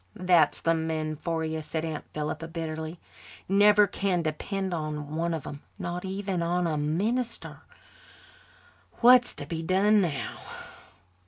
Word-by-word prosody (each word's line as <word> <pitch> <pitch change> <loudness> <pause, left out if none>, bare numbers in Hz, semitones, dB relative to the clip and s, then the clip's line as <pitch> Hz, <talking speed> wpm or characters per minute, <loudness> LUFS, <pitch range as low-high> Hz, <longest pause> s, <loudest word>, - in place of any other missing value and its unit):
"That's 175 -5 +3
the 165 - +3
men 160 -1 -2
for 165 +1 -2
you," 160 0 -3
said 160 +1 -3
Aunt 160 -2 -5
Philippa 155 +1 -4
bitterly. 160 0 -5 0.5
"Never 205 +2 +6
can 190 -3 -1
depend 185 +5 -3
on 150 -2 -4
one 170 +1 0
of 160 -4 -3
them, 145 - -8 0.2
not 175 -2 -4
even 190 -1 -2
on 175 +1 0
a 160 -2 0
minister. 210 +12 -1 1.4
What's 245 0 +6
to 145 - -6
be 160 +2 -4
done 200 +5 +3
now?" 155 -7 -3
165 Hz, 140 wpm, -27 LUFS, 155-190 Hz, 1.4 s, Never